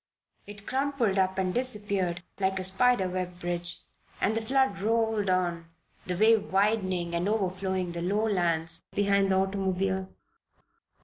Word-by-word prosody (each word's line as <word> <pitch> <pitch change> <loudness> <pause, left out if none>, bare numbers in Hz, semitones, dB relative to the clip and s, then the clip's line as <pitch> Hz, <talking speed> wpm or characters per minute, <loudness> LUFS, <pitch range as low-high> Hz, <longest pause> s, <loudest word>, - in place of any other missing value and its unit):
It 205 0 -10
crumpled 260 -7 0
up 190 0 +1
and 185 -1 0
disappeared 200 -8 -1 0.2
like 190 0 +1
a 185 - -2
spider 190 +2 +3
web 180 -1 -4
bridge, 175 0 -4 0.4
and 215 - +1
the 225 - 0
flood 260 -4 +1
rolled 220 -2 +1
on, 175 -2 0 0.4
the 180 -1 -2
wave 220 +1 +4
widening 190 -4 +1
and 170 +3 0
overflowing 190 -3 -1
the 170 0 -5
lowlands 175 -5 0
behind 200 -1 +2
the 190 - +3
automobile. 190 0 0
190 Hz, 135 wpm, -28 LUFS, 180-210 Hz, 0.4 s, wave